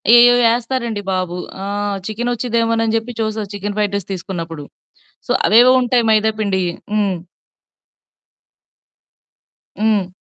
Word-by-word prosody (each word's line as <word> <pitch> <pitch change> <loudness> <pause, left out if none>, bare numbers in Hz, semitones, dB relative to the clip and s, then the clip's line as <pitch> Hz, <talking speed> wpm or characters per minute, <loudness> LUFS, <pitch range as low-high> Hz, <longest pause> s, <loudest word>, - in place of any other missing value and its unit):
ఏయేయో 245 0 +7 0.2
ఎస్తారండి 235 -3 -3
బాబు. 180 -1 -2 0.3
ఆహ్, 205 0 -2
చికెన్ 240 +3 -2
వచ్చిదేమోనని 230 -1 0
చెప్పి 230 +1 -6
చూస్తారు 215 -2 -3
చికెన్ 205 +1 -5
ఫ్రైడ్ 205 -1 0
రైస్ 200 -1 -8
తీసుకున్నప్పుడు 165 -5 -6 0.6
సో - - +2 0.2
అవేవో 240 +4 +7
ఉంటాయి 245 -1 +2
మైదా 215 0 +3
పిండియి 190 -4 0 0.2
హ్మ్. 200 -3 +1 2.7
హ్మ్. 210 -4 +2
215 Hz, 110 wpm, -18 LUFS, 195-230 Hz, 2.7 s, ఏయేయో